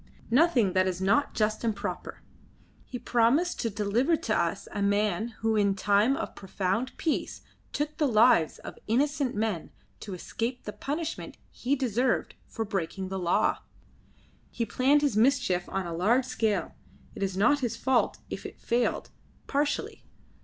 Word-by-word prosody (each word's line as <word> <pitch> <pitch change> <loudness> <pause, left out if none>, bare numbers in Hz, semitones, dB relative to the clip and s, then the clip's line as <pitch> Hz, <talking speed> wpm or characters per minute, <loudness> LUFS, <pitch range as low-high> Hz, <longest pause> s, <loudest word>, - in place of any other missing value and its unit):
"Nothing 250 - +4
that 185 0 +3
is 185 -1 -2
not 200 +10 +2
just 215 +1 0
and 225 -2 0
proper. 200 -3 -6 0.6
He 250 - -6
promised 245 +10 +2
to 230 - 0
deliver 220 - +1
to - - -1
us - - -1
a 205 - -3
man 205 +1 +1
who 225 0 +1
in 200 -2 +2
time 205 +6 +3
of - - -4
profound 195 +6 -2
peace 320 - -2 0.3
took 295 +1 -2
the 305 -3 +2
lives 215 - +4
of - - -10
innocent 275 +2 +1
men 210 -6 -2 0.3
to 200 -3 -6
escape 230 +7 -4
the 210 - -6
punishment 300 +9 -4
he 270 +3 -1
deserved 250 -1 0
for 225 - -4
breaking 190 -2 -3
the 190 0 -3
law. 175 -1 +2 0.9
He 230 - -2
planned 270 +7 +3
his 280 -7 +1
mischief 225 -7 +2
on 195 -1 -2
a 170 - -4
large 225 +10 +2
scale. 225 -5 -1 0.4
It - - -9
is 190 -1 -1
not 285 +9 +4
his 240 -4 -2
fault 260 -1 +1
if - - -5
it - - -9
failed, 240 0 -1 0.3
partially. 290 +1 -1
225 Hz, 160 wpm, -28 LUFS, 200-265 Hz, 0.9 s, Nothing